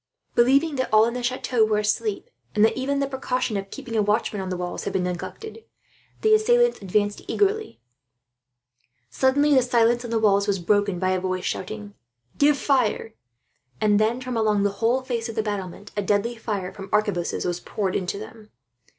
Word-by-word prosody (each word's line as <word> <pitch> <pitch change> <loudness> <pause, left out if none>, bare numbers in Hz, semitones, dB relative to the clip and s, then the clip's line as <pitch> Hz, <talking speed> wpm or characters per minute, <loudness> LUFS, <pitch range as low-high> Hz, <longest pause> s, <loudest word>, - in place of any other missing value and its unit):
Believing 275 +5 +3
that 260 - -1
all 215 0 +6
in 235 - -2
the 250 - -3
chateau 245 -1 0
were 215 -1 +2
asleep, 210 0 -1 0.2
and 210 - +5
that 225 - +1
even 275 +2 -1
the 275 - +1
precaution 255 -4 -2
of 195 0 -4
keeping 230 +3 -7
a 215 - +3
watchman 210 0 0
on 190 - -5
the 180 - -3
walls 180 0 -5
had - - -3
been 190 -2 0
neglected, 430 - -6 0.6
the 435 0 +4
assailants 480 - +3
advanced 205 +2 0
eagerly. 420 - 0 1.3
Suddenly, 285 +3 +3
the 260 - +6
silence 240 0 +2
on 240 - -6
the 230 - 0
walls 200 -2 +3
was 200 -1 +1
broken 200 +1 +1
by 185 +1 0
a 185 - +1
voice 185 0 -3
shouting, 210 +1 -5 0.5
"Give 290 0 +4
fire!" 250 -5 0 0.7
And 210 -1 +3
then, 225 +3 +1
from 255 -1 -5
along 215 -2 +2
the 205 - +2
whole 245 +3 +2
face 235 -2 -3
of 225 - -6
the 220 - 0
battlements, 200 -1 -5
deadly 205 +3 0
fire 205 -5 -4
from 195 -1 -9
arquebuses 205 -5 0
was 175 0 -1
poured 195 -1 -3
into 185 +1 -2
them. 215 +1 -11
215 Hz, 185 wpm, -24 LUFS, 200-255 Hz, 1.3 s, all